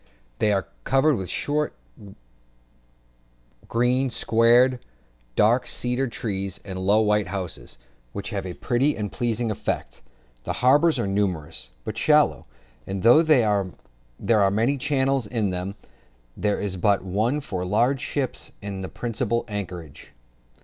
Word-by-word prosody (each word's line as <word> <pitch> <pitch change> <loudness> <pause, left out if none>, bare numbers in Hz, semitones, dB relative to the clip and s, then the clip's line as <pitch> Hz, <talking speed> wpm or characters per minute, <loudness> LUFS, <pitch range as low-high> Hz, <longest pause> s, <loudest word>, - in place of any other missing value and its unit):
They 105 - +3
are 95 -2 +1 0.2
covered 135 +4 +3
with 95 - -3
a - - -9
short 150 +1 -1 1.9
green 125 +3 +1
sward, 120 +2 +4 0.6
dark 120 +4 +3
cedar 125 +3 -1
trees, 100 -5 -4
and 95 -2 -5
low 100 +3 +3
white 105 -2 +2
houses, 95 -8 -6 0.3
which 100 - -6
have 100 -2 -2
a 90 - -6
pretty 135 +4 +1
and 105 -2 -3
pleasing 120 -1 -1
effect; - - -4 0.4
the - - -3
harbours 145 +5 +4
are 120 - 0
numerous, 95 -6 -2 0.2
but - - -4
shallow; - - +3 0.4
and 95 -1 -4
though 120 +8 +7
there 115 - +3 0.8
are 100 - +5
many 115 +8 +1
channels 135 -3 +1
into 105 -4 -1
them, 90 +2 -4 0.6
there 105 -1 0
is 100 -2 -2
but 100 +2 +2
one 110 +9 0
for 95 -10 -4
large 120 +8 +1
ships 135 -4 -3
into 100 -2 -6
the 95 - -5
principal 115 0 -2
anchorage. 90 -8 -7
110 Hz, 135 wpm, -24 LUFS, 95-125 Hz, 1.9 s, though